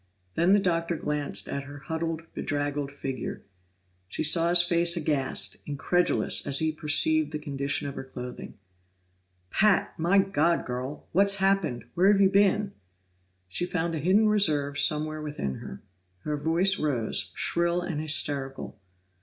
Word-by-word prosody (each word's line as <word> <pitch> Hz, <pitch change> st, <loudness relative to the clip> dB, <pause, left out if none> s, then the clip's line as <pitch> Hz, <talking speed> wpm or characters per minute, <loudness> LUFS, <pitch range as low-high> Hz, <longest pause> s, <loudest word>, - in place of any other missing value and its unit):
Then 175 Hz, +4 st, +3 dB
the 205 Hz, -, +5 dB
Doctor 170 Hz, -3 st, -1 dB
glanced 150 Hz, -2 st, -2 dB
at 140 Hz, 0 st, -5 dB
her 145 Hz, 0 st, -10 dB
huddled, 160 Hz, +2 st, -4 dB
bedraggled 145 Hz, -1 st, -3 dB
figure; 135 Hz, -3 st, -6 dB, 0.6 s
she 95 Hz, -, -3 dB
saw 165 Hz, +2 st, +5 dB
his 175 Hz, 0 st, +6 dB
face 170 Hz, 0 st, +2 dB
aghast, 145 Hz, -4 st, -1 dB
incredulous, 175 Hz, +5 st, +1 dB
as 140 Hz, -1 st, +3 dB
he 160 Hz, +1 st, +1 dB
perceived 155 Hz, 0 st, +2 dB
the 155 Hz, -, -3 dB
condition 140 Hz, -1 st, -2 dB
of 140 Hz, -, -5 dB
her -, -, -7 dB
clothing. 125 Hz, -1 st, -9 dB, 1.0 s
"Pat! 210 Hz, -2 st, +2 dB
My 175 Hz, +5 st, +2 dB
God, 170 Hz, -4 st, +1 dB
girl! 130 Hz, +3 st, -6 dB
What's 200 Hz, +3 st, +3 dB
happened? 190 Hz, -, 0 dB
Where've 195 Hz, +3 st, +3 dB
you 195 Hz, -1 st, +4 dB
been?" 200 Hz, 0 st, +2 dB, 0.8 s
She 135 Hz, -, -2 dB
found 170 Hz, -1 st, -2 dB
a 160 Hz, -, -3 dB
hidden 195 Hz, +8 st, +3 dB
reserve 150 Hz, -9 st, +2 dB
somewhere 155 Hz, 0 st, +1 dB
within 145 Hz, -, -4 dB
her. 65 Hz, -, -10 dB, 0.4 s
Her 150 Hz, +6 st, -3 dB
voice 165 Hz, +6 st, +1 dB
rose, 130 Hz, -7 st, -1 dB
shrill 170 Hz, +1 st, 0 dB
and 165 Hz, -4 st, -4 dB
hysterical. 140 Hz, -6 st, -1 dB
155 Hz, 145 wpm, -26 LUFS, 145-175 Hz, 1.0 s, his